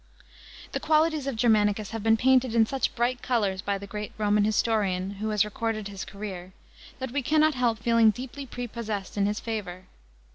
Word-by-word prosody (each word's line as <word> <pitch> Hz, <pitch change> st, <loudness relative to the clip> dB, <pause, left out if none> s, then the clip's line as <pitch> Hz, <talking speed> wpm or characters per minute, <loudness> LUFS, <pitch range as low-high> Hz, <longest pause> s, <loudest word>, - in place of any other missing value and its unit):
§ -, -, -32 dB
15. -, -, -29 dB, 0.5 s
The -, -, -2 dB
qualities 310 Hz, -2 st, +2 dB
of 275 Hz, -, -2 dB
Germanicus 215 Hz, -2 st, +2 dB
have 225 Hz, -1 st, -4 dB
been 225 Hz, +1 st, +3 dB
painted 255 Hz, -1 st, +3 dB
in 225 Hz, -1 st, +5 dB
such 270 Hz, +4 st, -2 dB
bright 240 Hz, +1 st, 0 dB
colours 205 Hz, -7 st, 0 dB
by 200 Hz, +1 st, -1 dB
the 200 Hz, -, -8 dB
great 210 Hz, +1 st, -6 dB
Roman 210 Hz, -1 st, +2 dB
historian 205 Hz, -4 st, +1 dB
who 220 Hz, -, -1 dB
has 210 Hz, -1 st, +2 dB
recorded 215 Hz, -1 st, -3 dB
his 195 Hz, -1 st, -6 dB
career, 190 Hz, -3 st, -7 dB, 0.4 s
that 260 Hz, -2 st, -5 dB
we 285 Hz, +2 st, 0 dB
cannot 310 Hz, +3 st, +3 dB
help 245 Hz, -3 st, +1 dB
feeling 230 Hz, 0 st, +4 dB
deeply 260 Hz, +5 st, -5 dB
prepossessed 225 Hz, -5 st, -5 dB
in 200 Hz, -1 st, +2 dB
his 210 Hz, +1 st, -1 dB
favour. 200 Hz, -5 st, -5 dB
220 Hz, 190 wpm, -27 LUFS, 205-245 Hz, 0.5 s, in